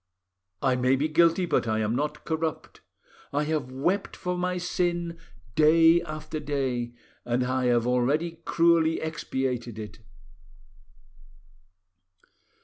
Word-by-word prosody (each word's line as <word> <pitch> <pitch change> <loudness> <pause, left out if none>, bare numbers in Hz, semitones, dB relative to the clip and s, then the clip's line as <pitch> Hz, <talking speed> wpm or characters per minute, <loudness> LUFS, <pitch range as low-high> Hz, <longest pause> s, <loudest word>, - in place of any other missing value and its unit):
I 130 -2 +3
may 125 +1 +3
be 145 +3 0
guilty, 170 +3 +3
but 165 - 0
I 110 0 +1
am 110 +1 0
not 150 +2 -3
corrupt. 160 -1 -3 0.5
I 145 +1 0
have 150 -4 -2
wept 175 +10 -1
for 180 -1 -3
my 180 0 -1
sin 175 -1 -2 0.3
day 165 +3 +5
after 155 -1 -6
day, 130 -5 -2 0.3
and 120 +1 0
I 130 0 0
have 120 -1 +2
already 145 +7 0
cruelly 165 -1 +3
expiated 130 -7 -3
it. 110 0 -8
150 Hz, 120 wpm, -27 LUFS, 125-165 Hz, 0.5 s, day